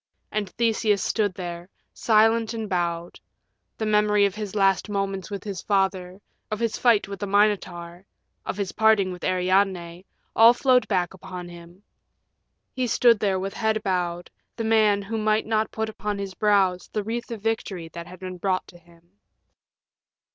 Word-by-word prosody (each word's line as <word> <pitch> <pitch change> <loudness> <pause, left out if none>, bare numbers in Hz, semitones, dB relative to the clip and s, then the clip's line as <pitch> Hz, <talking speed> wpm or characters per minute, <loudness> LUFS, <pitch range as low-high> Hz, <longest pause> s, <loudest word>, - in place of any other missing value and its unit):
And 210 -2 -2
Theseus 220 -3 +1
stood 205 -4 0
there, 175 -1 -7 0.2
silent 225 +1 +3
and 220 -1 -4
bowed; 170 -2 -2 0.6
the 220 - -2
memory 210 -1 +3
of 200 - 0
his 210 -1 -6
last 195 -1 +2
moments 195 -3 -2
with 200 -2 -6
his 200 -4 -5
father, 190 -2 -1 0.3
of 215 - -3
his 230 -2 -1
fight 230 -5 +3
with 200 -1 -7
the 205 - -3
Minotaur, 185 -4 0 0.4
of - - -4
his 200 -3 -2
parting 220 -3 +3
with 180 -1 -9
Ariadne 185 -1 0 0.3
all 230 +2 +7
flowed 255 0 +3
back 180 -4 0
upon 180 -1 -8
him. 175 +2 -14 0.9
He 255 -1 -1
stood 235 -1 +4
there 195 -2 +1
with 195 +1 -4
head 220 -1 -1
bowed, 175 -2 -2 0.2
the 230 - -4
man 215 -2 +3
who 220 +3 -3
might 215 0 +1
not 220 0 0
put 220 0 -3
upon 210 -1 -4
his 200 -1 -5
brows 195 -3 +2
the 210 - -2
wreath 235 +4 -4
of 225 -4 -7
victory 200 -6 -2
that 170 0 -9
had 180 0 -12
been 185 -1 -7
brought 185 0 0
to 175 - -15
him. 170 0 -23
200 Hz, 170 wpm, -24 LUFS, 180-215 Hz, 0.9 s, all